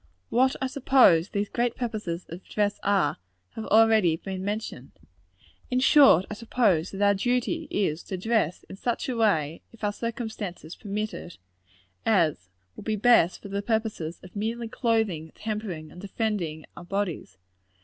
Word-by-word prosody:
What 260 +2 +3
I 265 - -1
suppose 255 -10 +4
these 205 0 -1
great 240 +2 -1
purposes 210 -8 -4
of 175 +3 -8
dress 205 -1 -1
are, 195 -7 +2 0.3
has 220 - -6
already 215 -6 +4
been 190 +1 -6
mentioned. 205 - -5 0.8
In 255 - +1
short, 265 - +6
I - - -6
suppose 210 -6 +1
that 195 +1 -3
our 200 0 +5
duty 250 - -1
is, 170 -5 0
to 190 - -4
dress 210 -4 0
in 190 - -10
such 240 +3 -2
a 250 - -1
way, 165 -9 +1
if 230 - -18
our 205 0 0
circumstances 220 -8 -5
permit 210 +1 -4
it, 175 - -9 0.7
as 160 - +1 0.3
will - - -10
be 220 - -1
best 210 -5 +4
for 200 - -8
the 200 +1 -2
purposes 215 -7 -2
of 185 +1 -13
merely 225 +3 -2
clothing, 220 -10 -1
tempering 210 -8 -5
and 180 - -11
defending 195 -7 -3
our 170 - -9
bodies. 180 - -3
205 Hz, 160 wpm, -26 LUFS, 175-225 Hz, 0.8 s, short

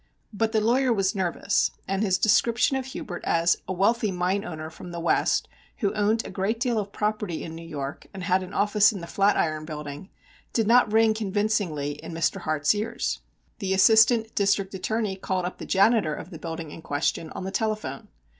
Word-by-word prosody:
But 220 +2 0
the 220 - +2
lawyer 250 +4 +2
was 195 -4 +1
nervous, 190 +1 +1 0.2
and 195 +1 -1
his 190 -4 +2
description 235 +6 +3
of 265 -1 -2
Hubert 195 -8 -7
as 170 +1 +2
"a - - -3
wealthy 210 +3 +2
mine 185 +2 0
owner 160 -5 -6
from 175 - -10
the 170 0 -6
West, 170 - +1 0.3
who 200 -2 0
owned 215 +2 +1
a - - -7
great 195 +5 -1
deal 240 -3 +1
of 200 -1 -5
property 210 -5 -2
in 160 - -7
New 165 +1 -8
York, 140 -2 -6
and 190 -1 -7
had 185 0 +2
an 185 0 -8
office 210 +2 +4
in 205 - -6
the - - -6
Flatiron 170 -4 +1
Building," 150 +2 -7 0.4
did 225 - +2
not 235 0 +5
ring 220 0 +4
convincingly 200 -9 -1
in - - -7
Mr. 165 -1 0
Hart's 155 0 +1
ears. 210 +2 -2 0.4
The 190 -2 0
Assistant 220 +3 +5
District 200 -1 +1
Attorney 205 +1 -2
called 185 -1 -2
up 180 - -5
the - - -7
janitor 195 -5 +3
of 180 - -9
the 165 - -8
building 165 -1 -6
in 165 - -9
question 150 +2 -1
on - - -5
the 190 - -4
telephone. 215 -10 -2
195 Hz, 195 wpm, -26 LUFS, 170-220 Hz, 0.4 s, not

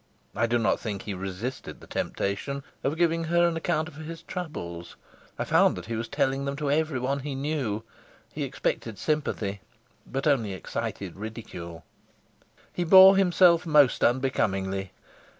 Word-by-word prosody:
I 115 - +2
do 120 +1 +2
not 115 -1 +1
think 105 -4 -4
he 105 - -4
resisted 95 +7 -5
the - - -13
temptation 140 +8 -3 0.2
of 145 +4 -1
giving 165 -1 +2
her 170 +1 +3
an 170 - -1
account 160 -1 -1
of 145 - -12
his 160 +1 -8
troubles. 85 - -6 0.4
I - - -1
found - - +4
that - - -7
he 115 +1 -4
was 115 +1 -3
telling 135 +4 0
them 140 0 -2
to 145 -1 -1
everyone 140 -3 0
he 140 0 -5
knew; 135 -7 -2 0.5
he - - -5
expected 110 -3 -2
sympathy, 110 -10 -2 0.5
but 135 +1 -3
only 120 -9 +2
excited 95 0 -5
ridicule. 95 -7 -8 0.9
He 175 - -1
bore 190 +3 +9
himself 180 -2 +5
most 150 -4 +4
unbecomingly. 95 -7 0
135 Hz, 150 wpm, -27 LUFS, 105-155 Hz, 0.9 s, bore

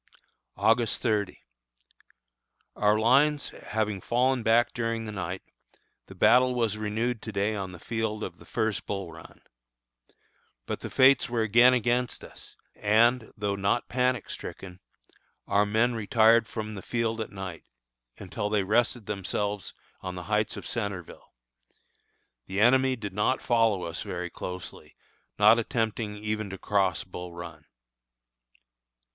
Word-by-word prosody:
August 115 0 +2
30. 105 -5 0 1.4
Our 105 0 +3
lines 140 +6 +3
having 105 -3 -3
fallen 125 +3 +1
back 115 +2 +3
during 115 -1 -2
the 110 - -5
night, 95 -2 -5 0.6
the - - -12
battle 125 0 +4
was 115 -4 0
renewed 110 +2 -2
to 110 - -6
day 100 +1 0
on 95 -3 -4
the 90 - -10
field 110 +3 -3
of - - -7
the - - -15
first 110 -5 -2
Bull 100 -4 -4
Run. 80 0 -14 1.2
But - - -4
the - - -6
fates 130 0 +5
were 120 -2 0
again 120 +4 +6
against 125 0 0
us, - - -14 0.2
and, 115 +3 +2
though 105 -1 -1
not 100 +4 0
panic 125 -1 0
stricken, 90 -1 -8 0.7
our 100 +1 +2
men 110 +4 +2
retired 115 +1 +4
from 110 -1 -5
the 100 - -7
field 115 0 -2
at 110 - -4
night, 95 -4 -7 0.5
until 105 +2 -4
they 105 -2 +1
rested 115 +2 +1
themselves 100 0 -3 0.3
on 90 -1 -5
the 90 - -6
heights 105 +3 0
of - - -8
Centreville. 100 -7 -5 1.2
The 95 +1 -3
enemy 130 +3 +4
did 105 -5 -6
not 105 +6 +1
follow 115 -6 +2
us 85 0 -4
very 90 -1 -5
closely, 90 0 -8 0.4
not 110 +3 +6
attempting 110 -2 -2
even 105 0 -3
to 95 - -6
cross 95 -2 0
Bull 90 -1 -8
Run. 85 -3 -9
110 Hz, 140 wpm, -27 LUFS, 100-115 Hz, 1.4 s, again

